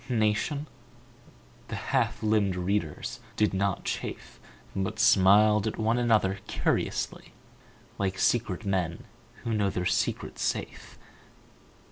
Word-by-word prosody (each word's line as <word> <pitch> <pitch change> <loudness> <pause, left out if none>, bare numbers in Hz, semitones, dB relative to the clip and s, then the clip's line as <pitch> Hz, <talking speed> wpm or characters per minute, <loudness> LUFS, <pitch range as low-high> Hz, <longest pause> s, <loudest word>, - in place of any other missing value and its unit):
Nation? 115 +6 +1 1.0
The - - -5
half - - -1
limbed 105 -3 +2
readers 90 -3 -2 0.2
did 105 -2 +2
not 100 0 0
chafe - - -5 0.4
But 95 -1 -2
smiled 105 0 +5
at 110 - -3
one 115 +2 +1
another 105 -5 +2
curiously - - -2 0.6
Like 95 -1 -1
secret 110 -2 +1
men 90 -4 -1 0.4
who 115 -1 -2
know 105 -2 +2
their 90 -1 -3
secret 90 - -1
safe. - - -3
105 Hz, 110 wpm, -28 LUFS, 95-110 Hz, 1.0 s, smiled